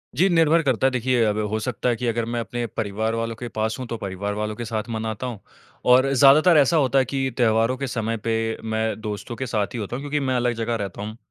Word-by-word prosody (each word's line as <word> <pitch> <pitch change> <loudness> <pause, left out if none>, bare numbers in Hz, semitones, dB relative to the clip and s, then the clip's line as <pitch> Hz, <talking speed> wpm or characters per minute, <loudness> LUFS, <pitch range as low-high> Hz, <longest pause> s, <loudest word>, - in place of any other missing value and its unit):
जी 185 - +4
निर्भर 165 -1 +4
करता 135 -2 +2
है। - - +1
देखिए 125 -1 +1
अब 105 0 0
हो 110 +1 -1
सकता 125 +1 -2
है 120 - +2
कि 125 +1 -3
अगर 115 0 0
मैं 120 - -1
अपने 120 +1 -3
परिवार 110 +2 -1
वालों 115 0 -2
के 120 +2 -6
पास 110 +1 0
हूँ 130 - -4
तो 115 - -4
परिवार 100 +1 -4
वालों 105 +1 -3
के 120 - -5
साथ 110 -1 -2
मनाता 110 +1 -3
हूँ। 120 -5 -6 0.5
और 130 +2 +5
ज़्यादातर 145 +6 +6
ऐसा 145 +3 +4
होता 135 -2 +3
है 130 - +2
कि 135 +1 -1
त्योहारों 115 +1 +2
के 135 0 -3
समय 115 -2 -2
पे 115 0 0
मैं 110 0 -1
दोस्तों 105 +2 -5
के 130 - -4
साथ 105 -3 0
ही 120 - -4
होता 105 +2 -4
हूँ 130 - -5
क्योंकि 145 0 -1
मैं 130 -2 0
अलग 120 0 +1
जगह 115 0 -2
रहता 100 -3 -5
हूँ। 110 +2 -6
115 Hz, 255 wpm, -23 LUFS, 110-130 Hz, 0.5 s, ज़्यादातर